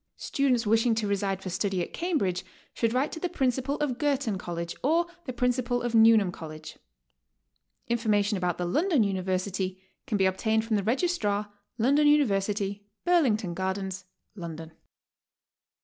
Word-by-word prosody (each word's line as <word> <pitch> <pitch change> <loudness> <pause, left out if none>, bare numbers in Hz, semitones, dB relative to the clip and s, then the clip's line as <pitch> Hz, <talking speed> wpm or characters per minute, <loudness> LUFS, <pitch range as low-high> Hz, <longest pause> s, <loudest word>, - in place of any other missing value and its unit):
Students 255 -4 +1
wishing 225 +2 +3
to 220 -2 -1
reside 195 -1 -1
for 185 - -4
study 195 +1 -1
at - - -8
Cambridge 275 - -1 0.3
should 230 -1 0
write 260 +5 0
to 320 - -6
the 360 - -2
Principal 265 -2 0
of 280 -5 -2
Girton 275 -9 0
College, 170 -1 -5
or 330 +5 +2 0.2
the 255 - -3
Principal 245 0 0
of 240 -1 -2
Newnham 220 -4 +6
College. 155 -2 -9 1.1
Information 215 -3 +1
about 180 -2 -1
the 180 - -2
London 300 - +2
University 185 -1 -2 0.3
can 210 - 0
be 190 - +3
obtained 220 +4 +1
from 225 -1 0
the 205 - +1
Registrar, 215 - 0 0.2
Lon 250 +4 +3
don 295 +1 +4
University, 205 -7 +1 0.2
Burlington 240 - +2
Gardens, 190 +1 -3 0.3
London. 165 -4 -7
215 Hz, 150 wpm, -27 LUFS, 190-255 Hz, 1.1 s, Newnham